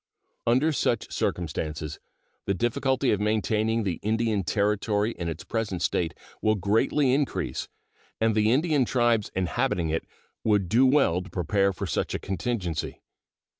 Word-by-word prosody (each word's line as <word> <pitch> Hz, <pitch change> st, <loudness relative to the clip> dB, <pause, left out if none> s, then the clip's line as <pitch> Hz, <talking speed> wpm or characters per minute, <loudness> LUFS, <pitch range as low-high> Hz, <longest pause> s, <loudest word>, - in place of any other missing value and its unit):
Under 130 Hz, +7 st, +3 dB
such 120 Hz, -5 st, 0 dB
circumstances 80 Hz, -2 st, -3 dB, 0.5 s
the 100 Hz, -, 0 dB
difficulty 130 Hz, +6 st, +1 dB
of 105 Hz, -, +1 dB
maintaining 110 Hz, +1 st, +1 dB
the 90 Hz, -5 st, -2 dB
Indian 110 Hz, -1 st, 0 dB
Territory 105 Hz, +2 st, +1 dB
in 85 Hz, -6 st, -4 dB
its 80 Hz, +1 st, -6 dB
present 105 Hz, -6 st, -2 dB
state 80 Hz, -2 st, 0 dB, 0.3 s
will 110 Hz, 0 st, +3 dB
greatly 110 Hz, +7 st, +2 dB
increase, 140 Hz, 0 st, -1 dB, 0.5 s
and 110 Hz, 0 st, +3 dB
the 110 Hz, +1 st, +3 dB
Indian 150 Hz, +1 st, +3 dB
tribes 120 Hz, -3 st, +2 dB
inhabiting 85 Hz, -2 st, 0 dB
it 80 Hz, +1 st, -2 dB, 0.4 s
would 105 Hz, -4 st, +2 dB
do 125 Hz, +6 st, +5 dB
well 130 Hz, -, +3 dB
to 95 Hz, -, -10 dB
prepare 100 Hz, +2 st, +1 dB
for 95 Hz, -, -5 dB
such -, -, -1 dB
a -, -, -2 dB
contingency. 90 Hz, -3 st, -3 dB
105 Hz, 140 wpm, -26 LUFS, 90-120 Hz, 0.5 s, do